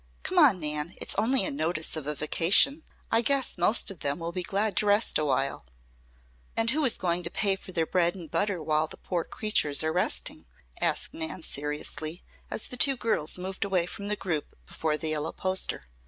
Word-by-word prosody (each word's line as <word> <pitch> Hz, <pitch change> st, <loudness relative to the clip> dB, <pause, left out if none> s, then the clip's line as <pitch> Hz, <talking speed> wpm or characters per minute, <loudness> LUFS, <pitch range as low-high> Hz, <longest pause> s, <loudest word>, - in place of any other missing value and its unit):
Come 370 Hz, -1 st, +1 dB
on, 260 Hz, -, +6 dB
Nan. 150 Hz, +2 st, -1 dB
It's -, -, -1 dB
only 225 Hz, +1 st, +2 dB
a -, -, 0 dB
notice 155 Hz, +3 st, -1 dB
of 155 Hz, -3 st, -4 dB
a 150 Hz, -, -2 dB
vacation. 170 Hz, -, +4 dB, 0.3 s
I 230 Hz, -, +4 dB
guess 275 Hz, +1 st, +1 dB
most 195 Hz, +4 st, +3 dB
of 185 Hz, -, -11 dB
them 140 Hz, 0 st, -1 dB
will 170 Hz, 0 st, -5 dB
be 180 Hz, +1 st, -3 dB
glad 200 Hz, +3 st, -1 dB
to 210 Hz, -, +1 dB
rest 205 Hz, -2 st, +3 dB
awhile." 135 Hz, -, -1 dB, 0.9 s
"And 225 Hz, +1 st, +3 dB
who 305 Hz, +3 st, 0 dB
is 250 Hz, -, +3 dB
going 175 Hz, -1 st, 0 dB
to 170 Hz, -, -4 dB
pay 195 Hz, +1 st, +1 dB
for 190 Hz, -, -12 dB
their 165 Hz, -3 st, 0 dB
bread 175 Hz, 0 st, +1 dB
and 170 Hz, -5 st, -10 dB
butter 200 Hz, -5 st, 0 dB
while 155 Hz, 0 st, +1 dB
the -, -, -10 dB
poor 175 Hz, -3 st, -3 dB
creatures 155 Hz, -10 st, +1 dB
are 160 Hz, 0 st, -1 dB
resting?" 180 Hz, -, -2 dB, 0.3 s
asked -, -, 0 dB
Nan 320 Hz, -, -4 dB
seriously, 150 Hz, +3 st, -3 dB, 0.3 s
as -, -, +2 dB
the 250 Hz, -, -6 dB
two 270 Hz, +1 st, +4 dB
girls 200 Hz, -10 st, +1 dB
moved 190 Hz, +1 st, -4 dB
away 190 Hz, -3 st, +1 dB
from 200 Hz, +3 st, -7 dB
the 210 Hz, -, 0 dB
group 170 Hz, -7 st, -4 dB
before 155 Hz, -1 st, -2 dB
the 160 Hz, -, -2 dB
yellow 155 Hz, 0 st, -2 dB
poster. 185 Hz, -, -1 dB
180 Hz, 200 wpm, -27 LUFS, 155-210 Hz, 0.9 s, on